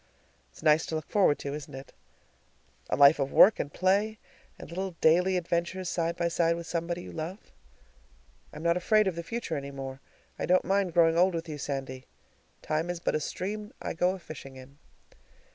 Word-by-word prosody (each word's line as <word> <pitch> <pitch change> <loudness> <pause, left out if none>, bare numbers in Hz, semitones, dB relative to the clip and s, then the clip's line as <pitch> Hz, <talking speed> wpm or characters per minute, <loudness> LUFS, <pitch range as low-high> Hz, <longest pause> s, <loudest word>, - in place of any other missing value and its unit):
It's - - -16
nice 155 0 +4
to 160 - -3
look 155 -1 -4
forward 190 -8 +3
to, 140 - -5
isn't 145 -2 -7
it 135 +1 -10 1.0
a - - +1
life 140 +1 +7
of 135 0 -1
work 215 - +7
and 145 - -3
play 200 +6 +1 0.4
and - - -10
little 185 +1 -4
daily 180 +4 +4
adventures 175 +1 -2
side 170 -1 -1
by 170 - +1
side 170 0 +1
with 170 0 -6
somebody 170 +1 -3
you - - -9
love? 165 +6 -7 1.0
I'm 150 +2 -9
not 170 +1 +2
afraid 215 +4 +3
of 190 -3 -1
the 170 - -4
future 170 -1 -4
any 140 0 -5
more. 135 -1 -7 0.4
I - - -2
don't 185 +1 +3
mind 195 -3 +1
growing 165 -1 +4
old 185 0 +4
with 165 0 -4
you, 150 -2 -6
Sandy. 135 -2 -5 0.6
"Time 155 +3 -1
is 175 -1 -3
but - - 0
the - - +1
stream 210 +7 -5
I - - -4
go 180 +3 +1
a - - -8
fishing 150 -6 -10
in." 130 +2 -14
170 Hz, 195 wpm, -28 LUFS, 150-185 Hz, 1.0 s, life